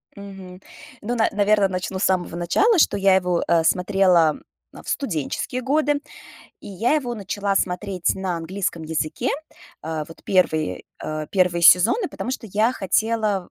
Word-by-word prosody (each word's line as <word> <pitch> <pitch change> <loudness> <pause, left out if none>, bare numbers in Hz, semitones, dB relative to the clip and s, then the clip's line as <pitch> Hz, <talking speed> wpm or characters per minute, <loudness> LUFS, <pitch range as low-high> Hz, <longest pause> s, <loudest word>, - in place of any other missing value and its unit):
Мгм. 195 -2 -11 0.4
Ну, 235 +3 -3
на 225 -2 +2
наверно, 205 -1 +2
начну 185 0 -4
с - - -2
самого 180 -2 0
начала, 350 - +2
что 250 - +3
я 195 -1 +4
его, 180 -2 +1
э, 165 -1 +3
смотрела 180 -3 +3 0.3
в - - -13
студенческие 225 - -3
годы, 290 +2 +1 0.6
и - - -13
я 220 +8 0
его 250 -6 -2
начала 200 -1 -2
смотреть 185 -1 -1
на 190 -2 -3
английском 170 0 -4
языке. 160 - -2 0.5
А, 155 -1 -4
вот 165 - -14
первые 160 -5 0
а, 155 0 -5
первые 180 -2 +1
сезоны, 225 - +5
потому - - -5
что 260 -3 -5
я 215 +4 +1
хотела 215 -2 0
190 Hz, 150 wpm, -22 LUFS, 175-220 Hz, 0.6 s, сезоны